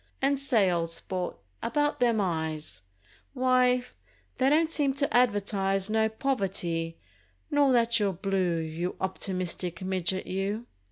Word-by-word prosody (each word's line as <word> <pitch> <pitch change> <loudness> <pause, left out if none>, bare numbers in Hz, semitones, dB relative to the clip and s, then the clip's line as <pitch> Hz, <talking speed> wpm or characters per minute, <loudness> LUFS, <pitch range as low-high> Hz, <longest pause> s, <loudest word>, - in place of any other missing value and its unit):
And, 275 0 +2
say, 225 -9 +3
old 165 -1 -1
sport, 180 +1 -3 0.2
about 295 +5 0
them 235 -3 +3
eyes: 160 - -2 0.5
Wye, 250 -1 +3 0.5
they 265 +1 +4
don't 315 +2 +3
seem 280 -4 +1
to 280 -2 0
advertise 200 -4 +2
No 220 0 +3
poverty, 190 -9 -1 0.5
nor 290 -2 +4
that 235 -1 +3
you're 205 -2 +2
blue, 185 -2 0
You 165 +2 -3
optimistic 185 -2 -2
midget 185 0 -1
you! 200 +5 -2
195 Hz, 125 wpm, -28 LUFS, 180-250 Hz, 0.5 s, they